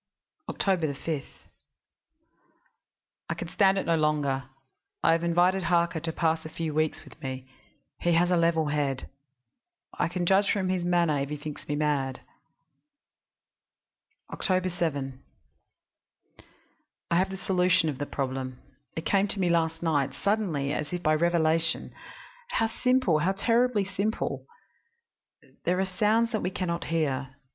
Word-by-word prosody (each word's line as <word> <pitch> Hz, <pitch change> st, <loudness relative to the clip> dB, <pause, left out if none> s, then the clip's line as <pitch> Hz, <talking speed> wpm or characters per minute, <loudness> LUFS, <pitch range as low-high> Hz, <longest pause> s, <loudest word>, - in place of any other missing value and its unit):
"Oct. -, -, -2 dB
5. 160 Hz, -5 st, 0 dB, 2.1 s
I -, -, +1 dB
can 170 Hz, -, -5 dB
stand 195 Hz, 0 st, +3 dB
it -, -, -1 dB
no 165 Hz, -, +3 dB
longer; 145 Hz, -4 st, +1 dB, 0.6 s
I -, -, +5 dB
have 165 Hz, +1 st, +2 dB
invited 180 Hz, +2 st, +2 dB
Harker 170 Hz, -1 st, +2 dB
to 165 Hz, +1 st, -3 dB
pass 160 Hz, 0 st, 0 dB
a 155 Hz, -, -7 dB
few 160 Hz, -1 st, -4 dB
weeks 155 Hz, 0 st, 0 dB
with -, -, -16 dB
me 130 Hz, -1 st, -5 dB, 0.5 s
he 175 Hz, -, +2 dB
has 175 Hz, +2 st, +3 dB
a -, -, +4 dB
level 165 Hz, -2 st, +2 dB
head. 145 Hz, -3 st, -1 dB, 0.9 s
I -, -, 0 dB
can 175 Hz, +1 st, -2 dB
judge 195 Hz, +3 st, +4 dB
from 190 Hz, -3 st, 0 dB
his 185 Hz, -1 st, 0 dB
manner 170 Hz, -4 st, +2 dB
if 140 Hz, 0 st, -2 dB
he 150 Hz, -, -3 dB
thinks 150 Hz, 0 st, -8 dB
me 145 Hz, -, -1 dB
mad. 145 Hz, -3 st, 0 dB, 2.1 s
"Oct. 185 Hz, -1 st, 0 dB
7. 140 Hz, -6 st, -2 dB, 1.9 s
I -, -, +3 dB
have 185 Hz, +3 st, +3 dB
the 190 Hz, -, -5 dB
solution 180 Hz, -3 st, +2 dB
of 145 Hz, -4 st, -3 dB
the 145 Hz, -, -3 dB
problem; 130 Hz, -2 st, -3 dB, 0.4 s
it 160 Hz, -, -4 dB
came 195 Hz, 0 st, +3 dB
to 200 Hz, -, -4 dB
me 180 Hz, -2 st, +2 dB
last 165 Hz, -1 st, +1 dB
night 145 Hz, -5 st, +1 dB
suddenly, 180 Hz, -10 st, 0 dB
as 150 Hz, -, -2 dB
by 155 Hz, -, +3 dB
revelation. 165 Hz, 0 st, +1 dB, 0.6 s
How -, -, +2 dB
simple 250 Hz, -7 st, +2 dB
how 180 Hz, +4 st, +1 dB
terribly 230 Hz, +1 st, +2 dB
simple! 200 Hz, +3 st, -2 dB, 1.2 s
"There 180 Hz, +1 st, +1 dB
are 190 Hz, -, +2 dB
sounds 215 Hz, +5 st, +2 dB
that 220 Hz, -, -1 dB
we 180 Hz, -, 0 dB
can 185 Hz, -1 st, -3 dB
not 170 Hz, 0 st, -2 dB
hear. 140 Hz, -5 st, -1 dB
170 Hz, 145 wpm, -28 LUFS, 150-185 Hz, 2.1 s, I